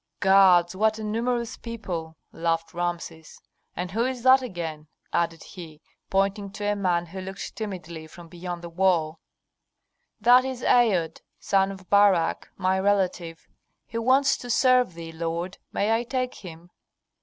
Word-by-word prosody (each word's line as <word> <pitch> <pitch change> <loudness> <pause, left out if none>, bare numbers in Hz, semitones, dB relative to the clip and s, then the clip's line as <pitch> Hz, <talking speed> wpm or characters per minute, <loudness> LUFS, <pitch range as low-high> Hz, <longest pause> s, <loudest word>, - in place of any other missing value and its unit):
"Gods, 190 -3 +5
what 215 +2 +2
a 220 - -6
numerous 235 +2 -2
people!" 180 -9 -6
laughed 165 0 -2
Rameses. 170 -2 -5 0.4
"And 180 +1 -4
who 225 +4 0
is 255 -1 -3
that 260 +1 +6
again?" 165 -9 -6 0.3
added 165 -1 -1
he, 165 -5 -11 0.3
pointing 195 +1 0
to 205 0 -5
a 205 0 +1
man 180 -3 0
who 190 +3 -8
looked 190 +1 -7
timidly 170 -7 -6
from 170 +2 -13
beyond 175 +1 -7
the 170 - -6
wall. 165 -3 +1 1.0
"That 245 +3 +6
is 260 -2 -5
Aod, 200 -10 +2 0.2
son 195 0 +1
of 190 -1 -11
Barak, 200 -5 +3
my 190 0 +1
relative. 185 -4 -1 0.4
He 230 - -5
wants 270 +4 +3
to 245 - -9
serve 250 -5 +3
thee, 165 -1 -8
lord. 170 +3 -4
May 210 +2 0
I 225 +1 +2
take 255 0 -2
him?" 175 -1 -12
190 Hz, 150 wpm, -25 LUFS, 170-220 Hz, 1.0 s, that